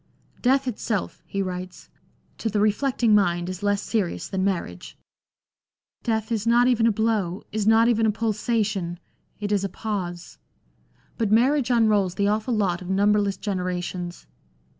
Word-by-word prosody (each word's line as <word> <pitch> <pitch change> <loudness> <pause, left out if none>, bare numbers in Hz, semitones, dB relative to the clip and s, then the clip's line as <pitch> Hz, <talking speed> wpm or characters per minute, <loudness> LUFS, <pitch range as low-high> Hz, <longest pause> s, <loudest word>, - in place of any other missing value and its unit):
" - - -37
Death 265 +1 +2
itself," 220 -3 -3
he 195 0 -2
writes, 185 -1 -6 0.3
" - - -39
to 225 - -1
the 210 0 0
reflecting 225 +2 +2
mind 175 -4 +2
is 185 +1 -6
less 205 0 0
serious 180 -6 -2
than 190 0 -2
marriage.... 170 - -3 1.0
Death 220 0 -1
is 225 -1 -1
not 240 +1 +5
even 235 -2 +3
a - - +4
blow, 210 -4 -1
is 215 -1 -1
not 225 +1 +5
even 225 -2 +3
a - - +3
pulsation; 215 -4 -1 0.4
it 205 -1 -3
is 200 -2 +1
a 195 - -1
pause. 180 -4 -5 0.8
But 220 -3 0
marriage 260 +4 +3
unrolls 210 -6 +3
the 200 +1 +1
awful 220 +3 0
lot 190 -5 0
of 180 - -8
numberless 200 0 +2
genera 185 -3 -2
tions." 175 0 -6
210 Hz, 160 wpm, -24 LUFS, 185-225 Hz, 1.0 s, not